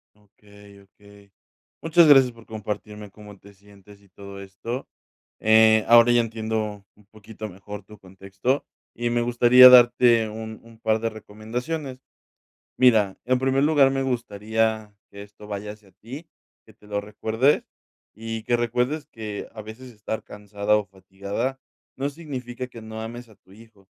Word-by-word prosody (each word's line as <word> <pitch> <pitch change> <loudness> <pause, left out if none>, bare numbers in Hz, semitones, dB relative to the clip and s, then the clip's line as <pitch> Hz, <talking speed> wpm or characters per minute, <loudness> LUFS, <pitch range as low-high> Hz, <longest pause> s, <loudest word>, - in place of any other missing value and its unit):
Okey, 105 -1 -19
okey. 100 0 -20 0.5
Muchas 165 +1 +5
gracias 135 -4 +6
por 115 -1 -18
compartirme 105 -1 -7
cómo 105 0 -14
te 100 +1 -17
sientes 100 0 -19
y 100 - -25
todo 100 +1 -11
esto. 100 +6 -7 0.5
Eh, 110 0 +5
ahora 120 +1 +7
ya 120 0 +4
entiendo 110 -2 -4
un 105 - -24
poquito 110 0 -10
mejor 100 +2 -10
tu 105 +2 -15
contexto, 95 +8 -3 0.3
y 120 0 -2
me 120 0 0
gustaría 120 +1 +7
darte 120 -2 +5
un 110 0 -8
un 115 -1 -17
par 110 -1 0
de 115 +1 -2
recomendaciones. 125 +7 -6 0.8
Mira, 110 -6 +3
en 130 0 +2
primer 135 +1 +1
lugar, 145 -3 +4
me 135 0 -1
gustaría 110 -3 -2 0.2
que 100 - -12
esto 105 +1 -14
vaya 105 0 -5
hacia 105 -2 -19
ti, 140 +9 -11 0.4
que - - -18
te 105 - -22
lo 105 0 -3
recuerdes, 110 +6 0 0.5
y 115 +1 -6
que 120 +1 +1
recuerdes 125 +6 -1
que 105 -3 -7
a 110 - -9
veces 115 +4 -11
estar 110 0 -6
cansada 105 0 -1
o 105 -1 -2
fatigada 100 +7 -5 0.4
no 135 +2 -2
significa 130 -5 -7
que 115 - -12
no 110 0 -8
ames 120 +2 -8
a 110 - -18
tu 95 - -24
hijo, 110 -2 -19
110 Hz, 160 wpm, -23 LUFS, 105-120 Hz, 0.8 s, ahora